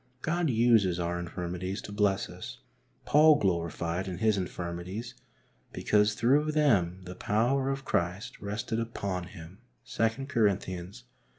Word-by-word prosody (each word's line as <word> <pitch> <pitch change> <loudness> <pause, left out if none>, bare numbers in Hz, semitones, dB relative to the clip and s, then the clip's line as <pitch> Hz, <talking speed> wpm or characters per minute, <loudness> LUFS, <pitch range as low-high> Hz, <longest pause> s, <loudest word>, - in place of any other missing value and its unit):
God 170 0 0
uses 110 -7 +3
our 85 0 -1
infirmities 90 +2 -4
to - - -8
bless 100 -1 +1
us. - - -9 0.5
Paul 155 +1 +6
gloried 85 - -1
in 90 -2 -4
his 110 +2 +2
infirmities 90 +4 -5 0.6
because 105 0 +2
through 140 +8 +2
them 95 - +2
the 90 0 -7
power 125 +8 +1
of 135 0 -3
Christ 90 +4 -2
rested 105 +2 -3
upon 100 -6 -3
him 85 +2 -12 0.3
(2 115 +4 -1
Cor, 110 -8 +2
xii. 90 -1 -7
100 Hz, 130 wpm, -29 LUFS, 90-115 Hz, 0.6 s, Paul